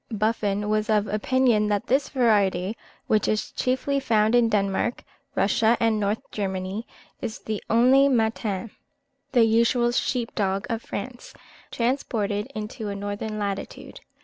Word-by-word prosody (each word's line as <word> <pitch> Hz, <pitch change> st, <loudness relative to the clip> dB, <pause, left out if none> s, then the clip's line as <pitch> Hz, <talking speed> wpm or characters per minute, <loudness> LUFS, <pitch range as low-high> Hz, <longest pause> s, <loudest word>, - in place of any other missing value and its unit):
Buffon 210 Hz, -2 st, 0 dB
was 215 Hz, +1 st, 0 dB
of 210 Hz, -1 st, +3 dB
opinion 215 Hz, 0 st, +2 dB
that 205 Hz, -1 st, 0 dB
this 275 Hz, +3 st, +1 dB
variety, 205 Hz, -6 st, +2 dB, 0.3 s
which 215 Hz, -1 st, +2 dB
is 215 Hz, -, -1 dB
chiefly 260 Hz, +2 st, 0 dB
found 220 Hz, -4 st, +2 dB
in 240 Hz, -1 st, +4 dB
Denmark, 200 Hz, +2 st, 0 dB, 0.3 s
Russia, 220 Hz, +3 st, +3 dB
and 225 Hz, -2 st, +2 dB
Northern 205 Hz, +1 st, -1 dB
Germany, 190 Hz, +1 st, -3 dB, 0.3 s
is 220 Hz, -, -4 dB, 0.3 s
only 255 Hz, +5 st, +5 dB
the 270 Hz, -, +2 dB
Mâtin 220 Hz, -2 st, -1 dB, 0.6 s
(the 240 Hz, -3 st, +6 dB
usual 235 Hz, +2 st, +3 dB
sheep 240 Hz, -1 st, -1 dB
dog 195 Hz, -1 st, -1 dB
of 230 Hz, 0 st, -2 dB
France) 240 Hz, +4 st, -7 dB, 0.3 s
transported 225 Hz, -5 st, -1 dB
into 215 Hz, +1 st, -5 dB
a 200 Hz, -, -4 dB
northern 205 Hz, +2 st, -4 dB
latitude. 200 Hz, -2 st, -5 dB
215 Hz, 135 wpm, -25 LUFS, 205-240 Hz, 0.6 s, the